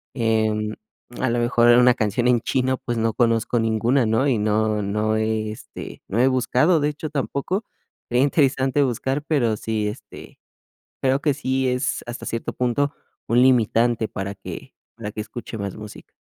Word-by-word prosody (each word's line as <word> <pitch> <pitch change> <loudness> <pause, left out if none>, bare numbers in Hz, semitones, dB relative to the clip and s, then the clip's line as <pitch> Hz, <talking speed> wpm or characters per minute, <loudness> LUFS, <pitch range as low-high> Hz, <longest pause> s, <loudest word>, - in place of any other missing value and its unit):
em, 110 -2 0 0.5
a 130 - +1
lo 120 - 0
mejor, 120 0 +3
en 120 +1 +7
una 125 0 +6
canción 110 +3 0
en 120 -2 +4
chino, 130 +1 0
pues, 120 -1 -3
no 115 -1 +1
conozco 115 0 +1
ninguna, 115 +3 +2
¿no? 115 +6 +2
Y 120 -6 +2
no 105 0 +1
no 105 +2 0
he, 110 -1 -1
este, 110 - -9
no 105 - -3
he 130 - +5
buscado, 130 +6 +2
de 145 +1 +1
hecho, 150 +1 -6
tampoco. 150 - -2 0.5
Sería 125 +2 +3
interesante 140 -1 +2
buscar, 130 +3 -1
pero 120 -9 +1
sí, 110 -1 -2
este, 105 - -9 0.6
creo 135 +1 +2
que 145 -3 +2
sí 130 -2 -1
es, 125 +1 -1
hasta 120 +1 -7
cierto 115 - -3
punto, 125 +4 0 0.4
un 120 +1 +4
limitante 120 -2 +3
para 100 +1 -5
que 95 - -9 0.2
para 105 -3 -6
que 110 - -5
escuche 115 +1 -8
más 100 -2 -4
música. 105 -1 -11
120 Hz, 175 wpm, -22 LUFS, 110-130 Hz, 0.6 s, en